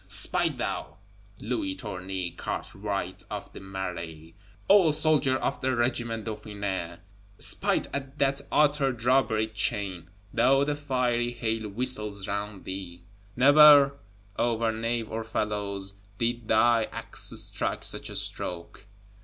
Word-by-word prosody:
Smite - - +3
thou, - - -4 0.4
Louis 290 -3 -2
Tournay, 95 - -4
cartwright 95 +1 -4
of - - -7
the - - -9
Marais, 90 -4 -6 0.3
old 185 -7 +6
soldier 150 -4 +3
of 135 - -2
the 130 0 0
Regiment 120 -2 -1
Dauphiné; 100 -5 -4 0.4
smite - - +1
at 140 0 -5
that 140 -1 +1
Outer 145 -3 +3
Drawbridge 115 -2 +1
chain, 100 -5 -1 0.2
though 135 +4 +4
the 145 +1 -1
fiery 125 -4 0
hail 110 -2 -2
whistles 105 -3 0
round 100 -1 -4
thee! 90 -2 -7 0.3
Never, 145 +1 +7 0.4
over 115 -1 +1
nave 115 0 -3
or 115 0 -3
felloe, 105 -2 -2 0.4
did 120 0 -2
thy 115 0 +4
axe - - -3
strike - - 0
such - - 0
a - - -7
stroke. 90 +3 -4
115 Hz, 120 wpm, -27 LUFS, 100-130 Hz, 0.4 s, Never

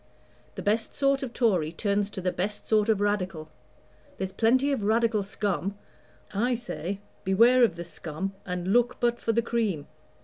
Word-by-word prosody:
The - - -6
best 220 +2 0
sort 275 -1 +2
of 265 -3 -4
Tory 185 -11 +1
turns 200 +3 0
to 195 - -6
the 180 0 0
best 200 +4 -3
sort 215 0 +2
of 210 -2 +2
Radical. 185 -6 -1 0.7
There's 190 -1 -3
plenty 255 +7 +3
of 265 -7 -1
Radical 220 0 +2
scum 200 0 -2 0.6
I 240 +5 +1
say, 200 -5 -5 0.2
beware 235 +7 +5
of 215 -8 +3
the 170 0 -6
scum, 170 +3 -5
and 180 0 -3
look 245 +1 +3
but 240 0 +1
for 230 - +1
the 230 +1 +1
cream. 220 -11 -1
205 Hz, 170 wpm, -27 LUFS, 190-235 Hz, 0.7 s, beware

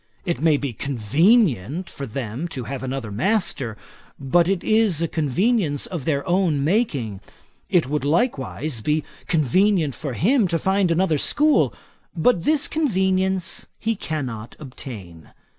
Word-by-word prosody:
It 170 -3 -2
may 155 -2 +4
be 140 -3 -4
convenient 140 - +2
for 140 - -7
them 125 +5 -4
to 130 -6 -5
have 130 +3 -5
another 130 -4 -4
master; 125 - 0 0.4
but 155 +5 +2
it 195 -2 0
is 215 -7 +3
a 165 - +1
convenience 160 - 0
of 165 -8 -6
their 145 +2 -1
own 175 -6 +1
making. 140 - 0 0.5
It 175 -3 +3
would 150 +2 -1
be 140 - -2
likewise 150 - -1 0.5
convenient 165 - +2
for 140 0 -5
him 225 - +2
to 170 -1 0
find 190 +1 +1
another 165 -2 +2
school; 300 - +3 0.5
but 170 +1 +2
this 310 0 +3
convenience 190 - 0
he 225 0 -1
cannot 130 - -5
obtain. 105 - -10
160 Hz, 140 wpm, -22 LUFS, 135-190 Hz, 0.5 s, may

